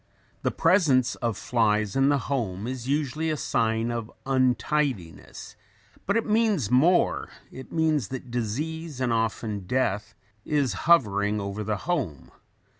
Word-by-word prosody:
] -, -, -36 dB
The -, -, +1 dB
presence 160 Hz, -8 st, +3 dB
of 115 Hz, -4 st, -2 dB
flies 110 Hz, -4 st, +1 dB
in 135 Hz, +1 st, +4 dB
the 145 Hz, -, +3 dB
home 115 Hz, -8 st, -3 dB
is 125 Hz, 0 st, -5 dB
usually 150 Hz, +2 st, -1 dB
a 155 Hz, -, -1 dB
sign 115 Hz, -2 st, 0 dB
of 115 Hz, -2 st, -4 dB
untidiness; 130 Hz, -, -1 dB, 0.5 s
but 200 Hz, +3 st, +2 dB
it 230 Hz, -, 0 dB
means 210 Hz, -, +1 dB
more, 160 Hz, +8 st, +3 dB, 0.2 s
it 130 Hz, -, -10 dB
means 155 Hz, -, +1 dB
that 130 Hz, 0 st, -7 dB
disease 145 Hz, +6 st, -3 dB
and 125 Hz, -2 st, +1 dB
often 110 Hz, -3 st, -2 dB
death 105 Hz, -4 st, -1 dB, 0.3 s
is 140 Hz, -7 st, 0 dB, 0.2 s
hovering 105 Hz, -9 st, +4 dB
over 100 Hz, +1 st, -4 dB
the 105 Hz, 0 st, -1 dB
home. 130 Hz, -, -2 dB
125 Hz, 140 wpm, -26 LUFS, 110-150 Hz, 0.5 s, in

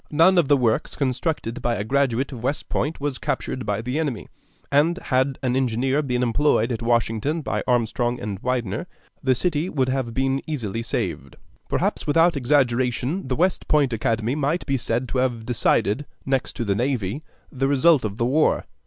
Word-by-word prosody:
None 170 Hz, +4 st, +5 dB
of 160 Hz, -, +2 dB
the 145 Hz, 0 st, +5 dB
works 115 Hz, -4 st, 0 dB
constructed 130 Hz, -2 st, -2 dB
by 120 Hz, -1 st, 0 dB
a 100 Hz, -, -2 dB
graduate 135 Hz, +2 st, 0 dB
of 125 Hz, -4 st, -7 dB
West 135 Hz, +5 st, -2 dB
Point 155 Hz, +3 st, -1 dB
was 145 Hz, -2 st, -3 dB
captured 130 Hz, -2 st, -3 dB
by 105 Hz, +1 st, -1 dB
the 125 Hz, +5 st, -2 dB
enemy; 145 Hz, -8 st, -3 dB, 0.4 s
and 155 Hz, +5 st, +3 dB
had 130 Hz, -5 st, 0 dB
an 125 Hz, -1 st, +1 dB
engineer 130 Hz, +2 st, +1 dB
been 125 Hz, -3 st, -1 dB
employed 125 Hz, -1 st, +2 dB
at 115 Hz, -, -3 dB
Washington 120 Hz, +6 st, 0 dB
by -, -, -1 dB
Armstrong 120 Hz, 0 st, +1 dB
and 100 Hz, -2 st, -5 dB
Winder, 120 Hz, -, -2 dB, 0.3 s
the 130 Hz, -2 st, +2 dB
city 165 Hz, +4 st, 0 dB
would 130 Hz, -6 st, 0 dB
have 130 Hz, -3 st, -2 dB
been 135 Hz, +1 st, +1 dB
easily 115 Hz, -8 st, -3 dB
saved. 115 Hz, -, -3 dB, 0.3 s
Perhaps -, -, -1 dB
without 165 Hz, +3 st, +4 dB
exaggeration 130 Hz, +3 st, +1 dB
the 130 Hz, -, -1 dB
West 180 Hz, +4 st, 0 dB
Point 145 Hz, -5 st, +3 dB
Academy 115 Hz, +1 st, 0 dB
might 150 Hz, +4 st, -1 dB
be 135 Hz, -, 0 dB
said 125 Hz, 0 st, -1 dB
to 130 Hz, -, -1 dB
have 120 Hz, -3 st, -1 dB
decided, 120 Hz, +1 st, +1 dB, 0.2 s
next 135 Hz, -1 st, -1 dB
to 120 Hz, -, -3 dB
the 100 Hz, -, +1 dB
navy, 120 Hz, +1 st, -1 dB, 0.3 s
the 135 Hz, -1 st, 0 dB
result 140 Hz, +1 st, +4 dB
of 105 Hz, -1 st, -3 dB
the 115 Hz, -, +1 dB
war. 150 Hz, +6 st, +2 dB
130 Hz, 180 wpm, -23 LUFS, 115-145 Hz, 0.4 s, None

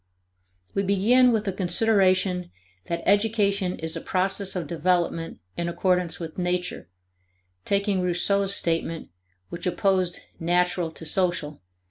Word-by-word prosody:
We 195 Hz, -, +1 dB
begin 215 Hz, +6 st, +4 dB
with 220 Hz, -2 st, 0 dB
a 195 Hz, -, 0 dB
consideration 185 Hz, -2 st, +2 dB, 0.4 s
that 170 Hz, 0 st, -3 dB
education 200 Hz, -2 st, +2 dB
is 160 Hz, 0 st, -3 dB
a 165 Hz, -, -4 dB
process 190 Hz, +1 st, 0 dB
of 175 Hz, -3 st, -2 dB
development 170 Hz, +1 st, -1 dB, 0.2 s
in 170 Hz, 0 st, -2 dB
accordance 180 Hz, 0 st, 0 dB
with 165 Hz, 0 st, -7 dB
nature, 180 Hz, -, -2 dB, 0.8 s
taking 200 Hz, -1 st, +1 dB
Rousseau's 195 Hz, +3 st, +1 dB
statement, 165 Hz, -1 st, -1 dB, 0.4 s
which 170 Hz, +1 st, -4 dB
opposed 185 Hz, -1 st, +1 dB, 0.2 s
natural 175 Hz, 0 st, +1 dB
to 160 Hz, 0 st, -11 dB
social 175 Hz, -2 st, +1 dB
(See -, -, -12 dB
ante, -, -, -23 dB
p. -, -, -44 dB
180 Hz, 135 wpm, -25 LUFS, 170-200 Hz, 0.8 s, begin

